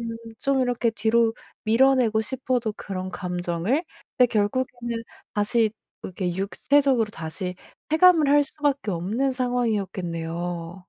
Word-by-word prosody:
음 230 - -4 0.3
좀 275 -1 +1
이렇게 245 -2 +1
뒤로 225 +1 +2 0.3
밀어내고 235 -1 +4
싶어도 250 -2 -1
그런 185 -1 -5
감정을 180 - -1 0.4
근데 250 - +7
결국에는 235 +2 -1 0.3
다시 215 +1 +2 0.3
이렇게 180 -1 -3
육체적으로 250 +4 +2
다시 165 +2 -5 0.4
체감을 320 -2 +6
할 290 0 +6
수밖에 285 -6 -1
없는 215 +10 -1
상황이었겠네요. 180 -8 -2
225 Hz, 290 characters per minute, -24 LUFS, 185-260 Hz, 0.4 s, 근데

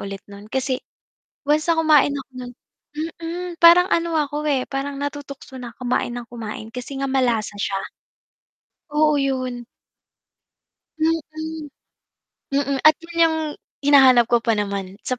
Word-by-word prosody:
ulit 195 -1 -7
no'n. 205 +1 -12
Kasi 260 +1 -1 0.7
once 305 +1 +2
na 335 - +5
kumain 300 -3 +4
ako 270 -1 -7
no'n 245 0 -8 0.7
mm, 350 +2 -4
parang 345 +2 +8
ano 335 -1 +1
ako, 295 0 -2
eh, 265 -3 +1
parang 275 +1 -3
natutukso 285 -2 -6
na 240 -2 -8
kumain 245 -1 -1
ng 240 - -5
kumain 220 -2 -7
kasi 250 +3 -7
nga 275 - 0
malasa 240 -6 +1
siya. 195 -1 -1 1.1
Oo 300 0 +3
yun. 255 -3 -2 1.3
Mm, 325 +1 +2 1.4
mm. 280 -1 +1
At 310 - +8
'yun 335 0 -11
'yung 320 - -1 0.5
hinahanap 265 -4 +6
ko 240 - +5
pa 230 -1 +1
naman 200 -2 -3
sa 255 - -3
270 Hz, 140 wpm, -22 LUFS, 240-300 Hz, 1.4 s, parang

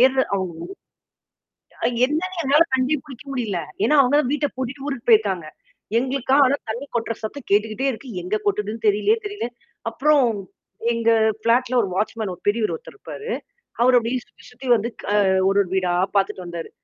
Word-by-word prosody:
ஏறுற 265 +1 +5
அவங்க 185 -3 -2 1.1
ஊ - - -3 0.2
என்னன்னு 345 +6 -2
என்னால 285 +3 +5
கண்டே 260 +3 +2
புடிக்க 270 -4 -11
முடியல. 225 -8 -2 0.3
ஏன்னா 300 +7 +4
அவங்க 270 +1 +3
தான் 255 - -2
வீட்ட 295 0 +1
பூட்டிட்டு 260 +2 -5
ஊருக்கு 260 -5 -5
போயிருக்காங்க. 200 -7 +4 0.5
எங்களுக்கா, 265 +1 +1
ஆனா 270 +2 +2
தண்ணி 240 +6 -4
கொட்டுற 230 -1 -1
சத்தம் 240 +4 -6
கேட்டுக்கிட்டே 215 +5 +1
இருக்கு. 255 +3 -10
எங்க 185 +5 -1
கொட்டுதுன்னு 210 +2 -1
தெரியலயே 210 - +3
தெரியல. 410 - -4 0.4
அப்புறம். 275 +3 +3 0.7
எங்க 230 0 +2 0.3
ஃப்ளாட்ல 245 +3 +2
ஒரு 200 - -2
வாட்ச்மேன் 215 0 -2
ஒரு - - -30
பெரியரு 215 +1 +1
ஒருத்தர் 475 - -14
இருப்பாரு. 465 +2 -7 0.5
அவரு 250 +1 +6
அப்படியும் 240 +2 -2
சுத்தி - - -21
சுத்தி 250 +2 -11
வந்து 225 +1 -2
க - - -3 0.4
ஒரு 195 +1 +2
ஒரு 190 - -8
வீடா 185 -2 +1 0.2
பார்த்துட்டு 195 -1 +1
வந்தாரு. 170 -1 -6
240 Hz, 165 wpm, -22 LUFS, 210-270 Hz, 1.1 s, அவரு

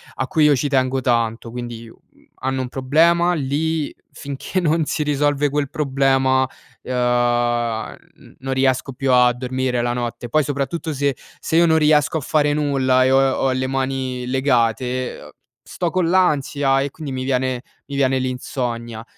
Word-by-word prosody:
a 135 - -2
cui 155 -2 +2
io 150 - +5
ci 145 +3 -1
tengo 130 -1 +1
tanto, 115 -1 0
quindi, 120 -1 -7
uhm, - - -16 0.4
hanno 130 0 -1
un 130 - -3
problema, 165 +7 +3
lì 155 +1 -1 0.2
finché 140 +6 -4
non 160 -2 +1
si 150 - -1
risolve 145 0 +1
quel 145 -1 -1
problema, 135 -2 +2 0.3
ehm, 120 -2 0 0.2
n - - -19
non 135 0 -3
riesco 130 0 +1
più 135 +1 -1
a 125 -1 +5
dormire 125 0 -2
la 120 0 -1
notte. 120 0 -4
Poi 155 +4 +2
soprattutto 145 +3 -3
se 140 -1 0 0.2
se - - -3
io 170 - +6
non 160 0 +4
riesco 150 0 +3
a - - -3
fare 145 +1 +1
nulla 135 -3 +2
e 130 - +2
ho 135 - +5
ho 135 - 0
le 130 0 -1
mani 130 -1 -2
legate, 125 -1 0
ehm, - - -12 0.3
sto 175 - -3
con 180 -2 +1
l'ansia 145 -6 +2
e 140 - -2
quindi 150 0 -8
mi 130 -1 -3
viene 130 -1 -1 0.3
mi 140 - -6
viene 135 -1 +2
l'insonnia. 120 -3 -4
130 Hz, 170 wpm, -20 LUFS, 125-145 Hz, 0.4 s, io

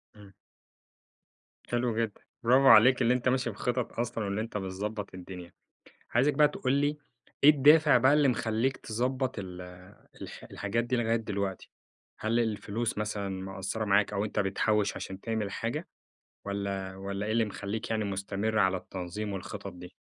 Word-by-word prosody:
إمم. 100 -2 -15 1.4
حلو 120 -1 0
جدًا، 115 -3 -2 0.2
برافو 130 +3 +5
عليك 125 +2 +7
اللي 120 0 +4
أنت 125 0 +1
ماشي 125 -2 +1
بخطط 125 +3 -2
أصلًا 120 -2 -2
وإن 100 +1 -2
أنت 110 -1 -3
بتضبّط 100 +2 -4
الدنيا. 90 -1 -9 0.6
عايزك 135 +5 +3
بقى 150 -1 +5
تقول 130 -2 -1
لي 145 +1 +1 0.5
إيه 145 - +10
الدافع 150 0 +6
بقى 130 +3 +5
اللي 150 -1 +4
مخلّيك 120 +1 0
تضبّط 130 +2 -2
ال 90 -2 -7 0.6
الح - - -8
الحاجات 110 +4 -1
دي 125 +1 -1
لغاية 115 -1 +1
دلوقتي؟ 100 -4 -3 0.5
هل 115 +2 +1
الفلوس 110 0 -2
مثلًا 105 -2 -2
مقصّرة 95 +3 -4
معاك 100 +1 +3
أو 100 +1 0
أنت 105 - -3
بتحوّش 105 +1 +1
عشان 95 0 -6
تعمل 110 -3 -2
حاجة، 120 - -3 0.6
والّا 100 -1 -3
والّا 100 +1 -4
إيه 110 - -1
اللي 115 0 +3
مخلّيك 105 +1 -5
يعني 110 -1 0
مستمر 100 +2 -2
على 95 -2 +3
التنظيم 95 +3 -5
والخطط 100 0 -6
دي؟ 90 0 -11
110 Hz, 155 wpm, -29 LUFS, 100-120 Hz, 1.4 s, إيه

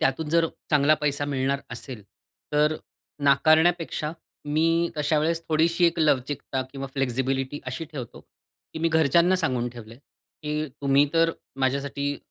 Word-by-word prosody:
त्यातून 140 +4 0
जर 165 0 +3 0.2
चांगला 150 0 +5
पैसा 145 -1 0
मिळणार 135 +1 0
असेल, 115 -1 -8 0.5
तर 150 +1 +3 0.5
नाकारण्यापेक्षा 155 +2 +3 0.3
मी 165 +3 +1
अशा 150 +1 +1
वेळेस 165 +2 0
थोडीशी 165 +2 +3
एक 170 0 0
लवचिकता 140 -3 0
किंवा 135 -1 -5
फ्लेक्सिबिलिटी 135 +1 -1
अशी 130 +5 -4
ठेवतो, 125 -5 -7
की - - -15
मी 165 +1 +1
घरच्यांना 165 +3 +3
सांगून 130 -8 -1
ठेवलंय 115 -1 -12 0.4
की 150 0 -2
तुम्ही 140 +1 +4
तर 165 0 +4 0.3
माझ्यासाठी 140 +2 -1
150 Hz, 130 wpm, -25 LUFS, 135-160 Hz, 0.5 s, चांगला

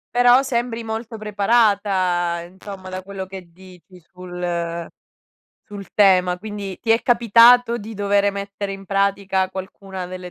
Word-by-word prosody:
Però 245 +2 +5
sembri 235 -3 -2
molto 225 +1 -5
preparata, 200 -5 +1
insomma, 190 0 -10
da 185 0 -5
quello 190 0 -7
che 190 -2 -10
dici 185 0 -17
sul 175 -1 -5 0.8
sul 200 -4 -9
tema. 185 -3 +4
Quindi, 205 -2 -7
ti 225 - -3
è 230 - +1
capitato 235 +1 +5
di 220 0 -8
dovere 200 0 +1
mettere 200 0 -6
in 195 0 -8
pratica 195 -1 0
qualcuna 190 -1 -7
delle 180 0 -8
195 Hz, 135 wpm, -21 LUFS, 185-215 Hz, 0.8 s, Però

